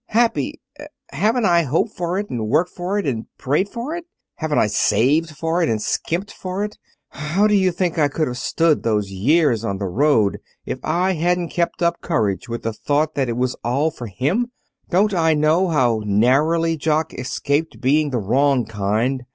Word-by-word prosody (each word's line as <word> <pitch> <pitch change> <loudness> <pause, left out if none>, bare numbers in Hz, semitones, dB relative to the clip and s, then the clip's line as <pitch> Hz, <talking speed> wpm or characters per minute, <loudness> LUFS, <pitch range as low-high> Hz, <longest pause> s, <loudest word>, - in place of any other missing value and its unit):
Happy! 230 +1 +1 0.5
Haven't 225 +2 +1
I 170 -2 +4
hoped 165 - -1
for 175 0 -2
it, 205 +1 -2
and 115 -3 -2
worked 165 +7 +2
for 185 +3 -3
it, 205 - -1
and 115 -6 -2
prayed 150 +9 0
for 245 +9 -5
it! 345 0 -7 0.3
Haven't 155 -2 -1
I - - +4
saved 135 +9 +2
for 165 +3 0
it, 165 - +2
and 110 -1 0
skimped 175 - -2
for 185 +2 -4
it! 210 0 -6 0.3
How 155 +8 0
do 210 - +3
you 190 -2 +3
think 175 -1 -1
I 150 - +4
could 155 +3 -1
have 125 0 -4
stood 165 +2 +1
those 105 -3 0
years 120 - +2
on 100 -3 -2
the 100 - -3
road 110 +1 +2 0.3
if - - -4
I 185 +2 +1
hadn't 175 +1 0
kept 170 0 -1
up 170 0 +1
courage 105 - -1
with 115 0 -4
the 115 - -2
thought 150 +6 0
that 135 -3 -1
it 115 - -2
was 125 0 0
all 140 +7 +1
for 120 - -8
him? 145 - 0 0.4
Don't 200 +3 +2
I 160 -3 +3
know 155 +5 +3
how 125 -9 +2
narrowly 150 +11 +2
Jock 155 +1 0
escaped 145 +4 -2
being 150 +3 +2
the 130 - -1
wrong 130 +4 +2
kind! 110 +5 -1
155 Hz, 190 wpm, -21 LUFS, 125-175 Hz, 0.5 s, I